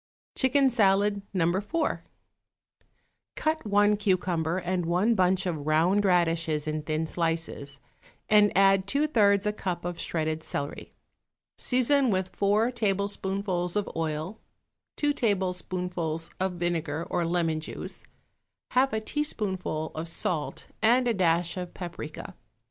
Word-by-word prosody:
=Chicken 265 0 +3
Salad, 200 -2 +3
No. 180 -4 +1
4.= 205 - 0 1.4
Cut 315 -6 -1
one 205 +1 +4
cucumber 180 -4 0
and 180 -1 -2
one 185 +7 +2
bunch 185 -1 +2
of 155 -5 -3
round 170 +7 +3
radishes 165 -4 +1
in 155 0 -2
thin 155 +1 -2
slices, 165 -4 -2 0.5
and 210 -1 +5
add 195 0 +4
two 280 +8 +2
thirds 205 -8 +3
a 210 - +1
cup 180 -4 -4
of 175 -1 -4
shredded 160 -1 -2
celery. 145 -2 -5 0.7
Season 260 +1 +3
with 185 -2 -1
four 210 +4 +2
tablespoonfuls 195 -4 -1
of 205 -1 0
oil, 160 +5 -3 0.6
two 295 -1 +1
tablespoonfuls 180 - -2
of 190 0 0
vinegar 170 -3 -2
or 175 - -1
lemon 165 -2 0
juice, 155 - -6 0.7
half 260 0 +3
a 220 - +1
teaspoonful 200 - -2
of 160 +2 -5
salt 165 -2 -2 0.2
and 245 +3 +4
a 235 - +2
dash 170 -2 +1
of 180 -1 -6
paprica. 175 0 -7
185 Hz, 125 wpm, -27 LUFS, 165-210 Hz, 1.4 s, and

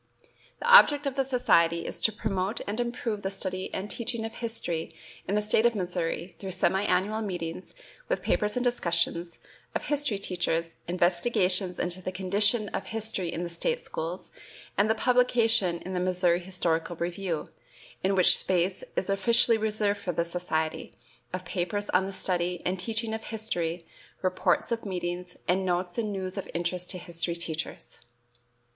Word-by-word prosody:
The - - -3
object 295 -11 +7
of 275 -2 -2
the 270 - +2
society 170 -10 +2
is - - -5
to 220 - +7
promote 200 -1 -2
and 210 +3 -3
improve 235 -3 -2
the 195 - -2
study 185 -1 -3
and 190 - -4
teaching 235 +1 -2
of 225 - -6
history 225 -9 -2 0.4
in 200 - 0
the 210 - +2
State 215 +1 +2
of 235 - -1
Missouri 175 -1 -2
through 195 - -6
semi 190 +1 +2
annual 200 +4 +1
meetings, 180 -3 -5 0.3
with - - -1
papers 210 0 +1
and 250 - 0
discussions, 170 -7 +1 0.4
of - - -2
history 290 -7 +1
teachers, 170 -3 -1
investigations 180 +1 +2
into 180 +1 -2
the 185 - -4
condition 205 +4 +3
of - - -4
history 220 -6 -1
in 170 - -3
the 175 - -4
State 475 - -1
schools, 175 - -5 0.4
and 205 +2 +2
the 220 - +3
publication 225 -6 +3
in 185 - -6
the 180 - -1
"Missouri 180 -1 +2
Historical 175 -2 -1
Review," 170 -1 -3 0.6
in 195 +1 +2
which 185 -2 +7
space 185 0 0
is - - -1
officially 225 +3 +4
reserved 210 -1 +1
for 180 -3 -3
the 170 +1 0
society, 170 -2 -3 0.4
of 185 0 -5
papers 185 +4 -2
on 190 +1 +2
the - - -5
study 180 -2 -1
and 185 +1 -1
teaching 220 +3 -2
of 220 0 -5
history, 175 -7 -2 0.4
reports 185 +2 +1
of 230 -1 -1
meetings, 180 -2 -4
and 185 +2 +2
notes 180 +1 -1
and 215 -2 -1
news 190 0 -3
of - - -7
interest 175 +1 -2
to 185 - -2
history 170 -1 -2
teachers. 160 -6 -5
185 Hz, 165 wpm, -28 LUFS, 175-215 Hz, 0.6 s, object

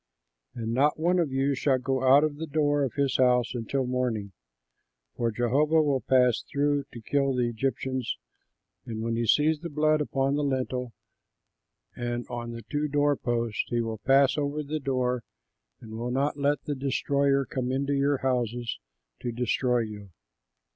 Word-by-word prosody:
And 115 -1 -3
not 145 +5 +2
one 175 +3 +2
of 160 -5 0
you 135 +1 +1
shall 135 0 +2
go 130 +1 -1
out 135 +3 +6
of 150 -2 -1
the 160 +1 -5
door 145 -1 +1
of 135 -3 -1
his 140 -2 +1
house 125 -1 +3
until 125 +3 -2
morning, 125 -5 -2 0.8
for 120 -1 0
Jehovah 135 +8 +2
will 140 -3 +1
pass 125 0 +3
through 145 0 0
to 120 - -9
kill 140 +3 +1
the 125 -1 +1
Egyptians, 130 +1 -2 0.7
and 110 0 -5
when 115 0 -1
he 115 0 -1
sees 150 +5 +3
the 170 +2 -6
blood 155 0 +2
upon 135 -1 0
the 145 +1 0
lintel 130 -3 -2 1.0
and 120 0 -3
on 120 -1 -5
the 115 0 -7
two 145 +7 -2
door 145 0 +2
posts, 120 -3 -1
he 120 - -1
will 115 -2 -3
pass 135 +4 +4
over 145 +1 -2
the 155 +2 -3
door 125 -3 -1 0.6
and 110 - -12
will 120 +2 -3
not 135 +4 0
let 145 +1 0
the 150 - -2
destroyer 140 0 +1
come 125 -1 -3
into 140 +2 0
your 140 0 +2
houses 120 -2 -1 0.4
to 120 - -3
destroy 125 +1 +1
you. 105 -3 -7
130 Hz, 170 wpm, -27 LUFS, 120-145 Hz, 1.0 s, out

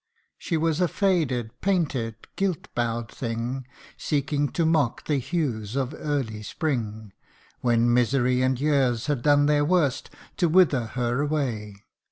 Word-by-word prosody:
She 165 - -1
was 165 +1 +1
a 180 - +4
faded, 155 - 0
painted, 145 - 0 0.2
guilt 190 -5 -2
bow'd 120 -1 -2
thing, 120 +2 -4 0.3
Seeking 145 -1 0
to 170 - +1
mock 155 -7 +1
the 145 -3 +1
hues 125 - -2
of 135 0 -1
early 135 -8 -2
spring, 110 - -3 0.5
When 120 -1 +2
misery 125 +1 +2
and 130 -1 +1
years 135 -5 +1
had 145 -5 -1
done 145 +1 +4
their 145 0 +3
worst 150 -5 +1 0.3
To 175 -3 +2
wither 155 -8 +4
her 125 +2 -1
away. 115 -9 -2
135 Hz, 140 wpm, -25 LUFS, 120-155 Hz, 0.5 s, a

